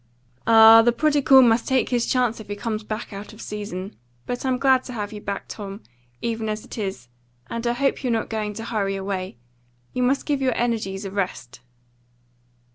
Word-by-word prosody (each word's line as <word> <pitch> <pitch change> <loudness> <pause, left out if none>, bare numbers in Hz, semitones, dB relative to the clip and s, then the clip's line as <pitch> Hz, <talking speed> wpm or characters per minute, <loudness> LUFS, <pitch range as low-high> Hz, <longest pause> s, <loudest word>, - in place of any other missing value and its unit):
"Ah, 225 0 +9
the 240 +1 +4
prodigal 280 0 +5
must 230 -1 +3
take 265 -2 +1
his 240 -2 0
chance 245 -3 +1
if 220 - -10
he 205 - -4
comes 215 0 -3
back 215 0 -6
out 200 +3 -8
of 215 - -15
season. 205 -2 -6 0.3
But 245 0 -4
I'm 255 -1 +1
glad 265 -1 +3
to 250 - -7
have 210 -2 -4
you 210 - -8
back, 200 -1 -5
Tom, 200 0 -8 0.4
even 225 -1 -2
as 215 0 -4
it - - -9
is, 190 - -4 0.4
and 230 +1 -3
I 235 - +2
hope 275 +3 0
you're 250 - 0
not 225 -1 0
going 215 -2 -3
to 225 - -6
hurry 200 -4 -1
away. 190 -6 -4 0.6
You 250 - -1
must 265 +3 +1
give 285 -2 0
your 255 -2 +1
energies 215 -5 -1
a 195 - -5
rest." 185 -12 -4
225 Hz, 200 wpm, -23 LUFS, 205-245 Hz, 0.6 s, Ah